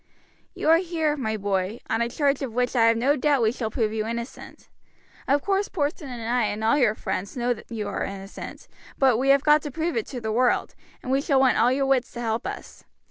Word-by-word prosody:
"You - - -3
are 325 +1 +7
here, 330 -4 -1
my 220 -6 -2
boy, 200 +2 -2
on 225 - 0
a 235 - 0
charge 280 +2 0
of 250 -5 -4
which 250 +1 0
I 230 -2 +5
have 230 0 +4
no 270 +5 +2
doubt 280 -2 +2
we 220 - +3
shall 230 -3 -3
prove 220 -2 -1
you 220 0 -2
innocent. 235 +2 -7 0.6
Of 280 +1 +2
course 400 0 +1
Porson 295 -3 -3
and 240 -2 -6
I 240 -1 +2
and 210 +1 -3
all 225 +5 +4
your 240 -7 +3
friends 200 +3 -4
know 245 0 +1 0.2
you 220 -3 -4
are 200 - -3
innocent, 195 0 -8 0.3
but 260 -4 +4
we 265 +3 0
have 275 0 +5
got 300 0 +5
to 295 - -5
prove 325 +4 -2
it 450 - -1
to 255 - -6
the 220 -2 -3
world, 245 +3 +1 0.3
and 255 - -4
we 270 +1 +2
shall 280 -2 +2
want 265 -1 +3
all 240 +2 +4
your 275 +1 +1
wits 265 -2 +1
to 240 - -7
help 225 -1 -2
us. - - -8
250 Hz, 240 wpm, -25 LUFS, 225-280 Hz, 0.6 s, are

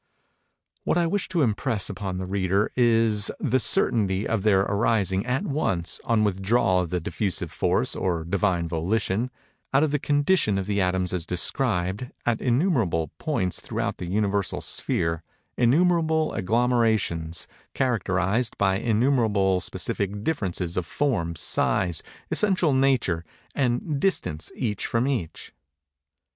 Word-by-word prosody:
What - - +1
I 175 - +3
wish 195 +4 -1
to 175 -5 +1
impress 110 -2 0
upon 95 -1 -4
the 95 - -3
reader 95 +2 0
is 115 -4 +3
the 130 -2 +1
certainty 105 - +2
of 115 -3 0
there 95 -2 +4
arising, 100 -1 +1
at 125 +2 0
once, 95 - -1
(on 115 -2 +2
withdrawal 95 0 +2
of 90 -2 -2
the 90 +1 -1
diffusive 95 +3 -3
force, - - 0
or 85 -3 -1
Divine 90 -1 0
Volition,) 95 +7 -1 0.4
out 135 +2 +4
of 155 - +1
the 150 - +1
condition 145 - +2
of 95 - -2
the 100 0 0
atoms 90 0 0
as 90 -3 -2
described, 95 +2 -1 0.2
at 120 -2 0
innumerable 120 - +1
points 90 -1 -1
throughout - - -3
the 90 - -6
Universal 100 0 0
sphere, 80 -1 -1 0.3
innumerable 160 +4 +2
agglomerations, 110 -7 0 0.3
characterized 115 -2 0
by 95 -1 +2
innumerable 110 -5 +2
specific 100 +3 -2
differences 95 - -2
of 90 -2 -1
form, 110 -13 -1
size, 85 +2 0 0.3
essential 185 -7 +3
nature, 130 -11 +2 0.3
and 135 +3 0
distance 80 - -1
each 105 -6 -2
from 115 +3 0
each. 120 - -4
105 Hz, 130 wpm, -25 LUFS, 95-125 Hz, 0.4 s, there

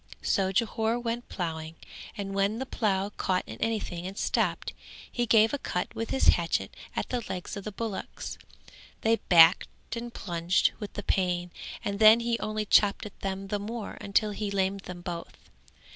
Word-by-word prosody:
So 190 -1 +2
Jhore 225 +2 +1
went 240 0 -3
ploughing 160 -3 -4 0.4
and 195 -1 -4
when 200 +2 +1
the 265 - -3
plough 200 -5 0
caught 185 -1 +1
in - - -9
anything 190 -6 -2
and 195 +1 -8
stopped, - - 0 0.4
he 240 -1 -1
gave 220 +1 +5
a 285 - -1
cut 180 -3 -3
with 225 0 -4
his 265 - +3
hatchet - - +1 0.2
at - - -2
the 250 -1 -1
legs 185 +2 -4
of 200 - -7
the 215 - -3
bullocks; 215 -1 -5 0.6
they 225 +1 +3
backed 170 +5 +4
and 235 +1 -5
plunged 175 -3 +1
with 210 - -6
the - - -5
pain 180 -2 0 0.3
and 200 0 -2
then 220 +1 +9
he 235 0 0
only 215 0 -2
chopped 205 0 +4
at 210 - -10
them 195 0 -4
the 205 - -1
more 220 +1 -5
until 205 +1 +1
he 205 0 -3
lamed 195 0 0
them 175 -1 -7
both. 175 -2 -6
200 Hz, 175 wpm, -28 LUFS, 190-225 Hz, 0.6 s, then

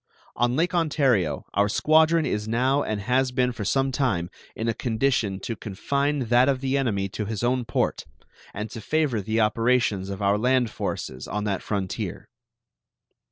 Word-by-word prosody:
On 120 +1 +1
Lake 165 +4 +1
Ontario 140 - +1
our 100 +1 +2
squadron 160 +6 +4
is 105 -5 -2
now 130 +5 +2
and 110 -5 -2
has 125 +4 +1
been 125 0 +1
for 115 -3 -6
some 135 +6 +1
time 105 -11 0 0.2
in 110 - -3
a 115 - +1
condition 110 -4 0
to 115 - -4
confine 140 +9 -1
that 125 +3 +5
of 135 -2 +1
the 135 0 -1
enemy 110 -8 0
to 105 +2 -4
his 110 +1 -4
own 125 0 +1
port, 120 - -1 0.5
and 105 +2 -5
to 115 - -7
favor 145 -3 0
the 110 +3 -1
operations 110 -3 +1
of 100 -1 -5
our 100 0 +2
land 125 -1 +2
forces 65 +1 -4
on 105 0 -3
that 100 -2 -1
frontier. 95 -3 -4
120 Hz, 170 wpm, -25 LUFS, 105-135 Hz, 0.5 s, that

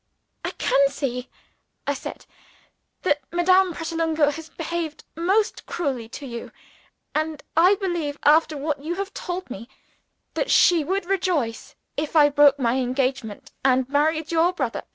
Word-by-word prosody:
"I - - -1
can 275 0 +3
see," 255 -3 -4 0.6
I 285 - +1
said, - - -8 0.8
"that 295 -5 +2
Madame 370 +2 +4
Pratolungo 325 -2 0
has 320 +2 -8
behaved 330 -1 -4
most 385 +6 0
cruelly 265 -9 -3
to 280 - -8
you. 235 -3 -7 0.6
And 310 -1 -2
I 360 +5 +6
believe, 345 -7 -2
after 310 0 +4
what 290 0 -2
you 335 +3 -2
have 395 +1 -4
told 360 -5 -5
me, 230 +4 -8 0.6
that - - -1
she 345 -4 +5
would 380 +5 -1
rejoice 345 - -1 0.2
if 300 +2 -3
I 295 -2 +7
broke 285 -1 +5
my 245 -2 +1
engagement, 255 -3 -2
and 260 -1 +3
married 310 +2 +1
your 335 +2 +3
brother. 260 -9 -2
310 Hz, 145 wpm, -24 LUFS, 275-345 Hz, 0.8 s, I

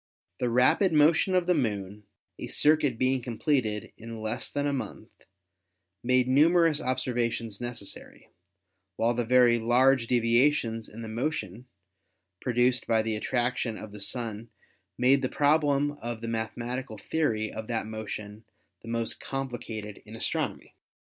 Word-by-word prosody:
The 125 - 0
rapid 125 - +4
motion 160 +5 +4
of 180 -1 +2
the 180 - +3
Moon, 105 - -2 0.3
a - - -5
circuit 150 -5 +3
being 130 +1 +1
completed 115 -2 -1
in 115 0 -8
less 110 +4 -3
than 145 0 -2
a 145 - 0
month, 135 - -6 0.9
made 125 0 +3
numer 165 +6 +5
ous 155 -2 0
observations 120 -4 -2
necessary, 120 -4 -6 0.7
while 115 +4 +1
the 120 0 -1
very 120 0 +4
large 125 +2 +3
devia 120 +3 +4
tions 115 -4 -4
in 115 +2 -9
the - - -6
motion 115 - -3 0.7
produced 125 0 +1
by 110 -1 +2
the 110 -1 -1
attraction 120 0 -1
of 110 - -9
the 105 - -10
Sun 115 0 -3 0.5
made 135 +2 +4
the 130 - -1
problem 145 -1 +2
of 120 -1 -5
the 115 - -5
mathematical 115 +1 -4
theory 110 -2 -1
of 110 - -6
that 115 -3 -1
motion 110 -1 -7 0.4
the - - -13
most 115 0 -1
complicated 115 -6 -5
in 110 +1 -11
astronomy. - - -3
120 Hz, 145 wpm, -28 LUFS, 110-135 Hz, 0.9 s, numer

